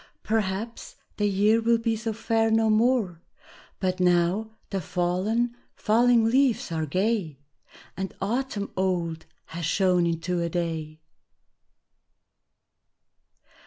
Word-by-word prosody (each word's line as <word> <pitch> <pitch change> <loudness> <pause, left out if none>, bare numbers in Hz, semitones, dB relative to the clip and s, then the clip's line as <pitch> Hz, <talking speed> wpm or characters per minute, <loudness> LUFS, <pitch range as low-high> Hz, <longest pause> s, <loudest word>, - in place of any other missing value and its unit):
Perhaps 220 - -2 0.2
the 210 - +1
year 210 +3 +3
will 230 +1 +3
be 230 0 0
so 225 +1 -3
fair 225 0 0
no 220 0 +3
more, 215 -6 +2 0.6
But 185 -1 -1
now 180 +4 +2 0.2
the 195 -2 -1
fallen, 190 +9 -1 0.2
falling 235 +1 +3
leaves 250 -4 +2
are 160 -1 -2
gay, 185 -2 -1 0.6
And 190 0 -4
autumn 215 0 -2
old 175 -4 -1 0.3
has 170 +1 -5
shone 180 +1 +2
into 170 +1 -1
a 170 - -1
Day! 160 -2 -3
200 Hz, 110 wpm, -26 LUFS, 175-225 Hz, 0.6 s, year